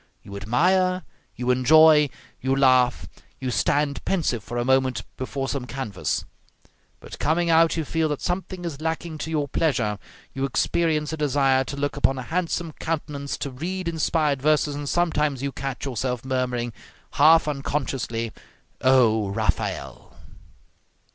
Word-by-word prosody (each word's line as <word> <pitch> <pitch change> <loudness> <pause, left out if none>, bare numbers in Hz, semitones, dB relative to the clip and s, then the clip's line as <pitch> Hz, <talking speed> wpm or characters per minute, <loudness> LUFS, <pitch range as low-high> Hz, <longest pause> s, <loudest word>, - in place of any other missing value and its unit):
You 100 - -10
admire, 180 - +2 0.3
you 125 +1 0
enjoy, 150 +3 +6 0.3
you 130 +1 +1
laugh, 130 -2 +3 0.3
you 130 -1 -3
stand 140 +2 0
pensive 155 - -1
for 120 - -6
a 120 - 0
moment 130 -4 +2
before 135 +1 -4
some 130 -3 -3
canvas; 105 - -3 0.7
but - - -11
coming 165 +3 +1
out, 165 +1 +4
you 160 - -1
feel 160 +1 0
that 150 - -2
something 180 0 -3
is 155 -3 -5
lacking 160 0 -3
to 160 - -4
your 150 -3 -1
pleasure, 120 -9 0 0.3
you 135 - -3
experience 155 +3 0
a - - -3
desire 135 -2 +2
to 140 - -6
look 145 +1 -2
upon 135 -1 +2
a 130 - -4
handsome 170 +3 -2
countenance, 150 -3 -3
to 140 - -4
read 175 +7 -4
inspired 155 -4 0
verses, 150 0 +2
and 145 0 -4
sometimes 150 -6 0
you 140 - -1
catch 135 -1 -5
yourself 125 -1 -3
murmuring, 125 -2 -1 0.4
half 160 +2 +5
unconsciously, 135 -5 -2 0.5
"O 115 -6 +4
Raphael!" 100 - -3
140 Hz, 145 wpm, -24 LUFS, 130-160 Hz, 0.7 s, enjoy